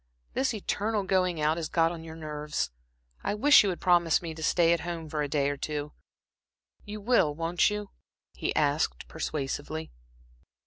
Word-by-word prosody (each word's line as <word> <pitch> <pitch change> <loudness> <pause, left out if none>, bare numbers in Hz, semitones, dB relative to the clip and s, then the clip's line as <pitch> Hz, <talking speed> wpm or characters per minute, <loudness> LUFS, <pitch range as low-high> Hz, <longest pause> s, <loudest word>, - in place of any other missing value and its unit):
This 265 +1 +1
eternal 210 +1 -1
going 185 -3 +1
out 155 +2 +2
has 160 -2 -3
got 165 -1 +2
on 165 -2 -7
your 160 -1 -9
nerves. 150 -1 -3 0.5
I - - -1
wish 290 +8 +7
you 205 - +1
would 180 - -3
promise 175 -3 +4
me 165 -2 -6
to 160 - -10
stay 170 +1 +4
at 170 - 0
home 170 -1 -5
for 150 0 -2
a 145 - 0
day 140 -1 +1
or 145 0 -1
two. 150 +1 -4 0.9
You 210 +1 -7
will, 200 -9 +2
won't 165 +4 +2
you?" 210 -1 -5 0.4
he - - -2
asked, 150 0 +1
persuasively. 155 +1 -4
165 Hz, 175 wpm, -28 LUFS, 150-185 Hz, 0.9 s, wish